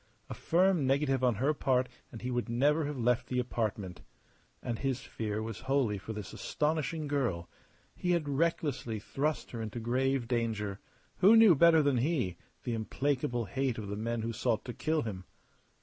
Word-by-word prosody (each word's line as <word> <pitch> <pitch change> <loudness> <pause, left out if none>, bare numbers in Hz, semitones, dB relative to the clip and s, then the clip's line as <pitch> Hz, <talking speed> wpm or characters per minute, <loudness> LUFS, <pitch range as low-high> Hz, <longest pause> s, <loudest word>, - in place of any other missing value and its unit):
A - - -2
firm 175 -4 +2
negative 135 -1 +1
on 125 -3 +3
her 135 +8 +1
part 130 -3 +1 0.2
and 115 - -9
he 125 - -2
would 120 -1 -1
never 145 +6 +2
have 145 -1 -4
left 120 0 +1
the 125 - -2
apartment. 110 -7 -2 0.6
And 115 -2 -3
his 135 -2 -1
fear 110 -3 -4
was 110 -2 -5
wholly 130 -6 0
for 105 - -7
this 105 -3 -6
astonishing 155 0 -1
girl. 120 -13 -1 0.5
He 180 0 0
had 165 -4 0
recklessly 145 -6 0
thrust 145 +8 -2
her 115 - -5
into 110 +1 -4
grave 130 +2 0
danger. 110 -5 -1 0.4
Who 205 +5 +7
knew, 225 -5 +8
better 160 +1 +6
than 140 -3 +2
he, 125 - 0 0.3
the 120 - -2
implacable 120 +2 -1
hate 130 +5 -1
of 105 -3 -5
the 100 - -3
men 115 +1 -2
who 115 +1 -2
sought 115 -1 0
to 120 - -5
kill 155 +3 0
him? 95 -5 -6
125 Hz, 180 wpm, -31 LUFS, 115-145 Hz, 0.6 s, knew